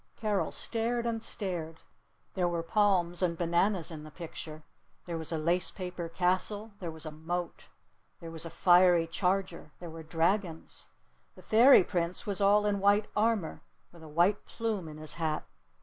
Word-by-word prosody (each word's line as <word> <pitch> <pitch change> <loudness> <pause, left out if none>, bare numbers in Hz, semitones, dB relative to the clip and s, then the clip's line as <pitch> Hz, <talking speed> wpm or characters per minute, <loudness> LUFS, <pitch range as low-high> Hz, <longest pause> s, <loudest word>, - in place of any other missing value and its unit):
Carol 210 -3 -1
stared 235 +1 -2
and 230 -1 -1
stared. 170 -7 -5 0.5
There 180 -2 +1
were 170 -1 -2
palms 175 -2 +2
and 170 -2 0
bananas 175 +1 +1
in 155 -2 -8
the 155 - -10
picture. 155 -1 -9 0.4
There 170 - -4
was 160 - -4
a 165 - -1
lace 170 +3 +1
paper 180 -3 -6
castle. 185 +5 0
There 175 - -5
was 160 0 -7
a 155 - -5
moat. 170 +3 -5 0.5
There 165 -1 -8
was 165 -1 -5
a 165 - -5
fiery 175 -1 +5
charger. 180 -2 -2
There 175 -2 -8
were 165 0 -8
dragons. 165 +2 -2 0.5
The - - -15
Fairy 235 0 +7
Prince 175 -1 -2
was 200 -1 -2
all 205 +1 +4
in 205 -1 +1
white 205 +2 +3
armor, 215 -5 0 0.3
with 170 - -16
a 160 - -11
white 175 +7 +2
plume 220 -7 -3
in 155 -1 -9
his 155 0 -2
hat. 160 -2 -2
175 Hz, 170 wpm, -30 LUFS, 165-205 Hz, 0.5 s, Fairy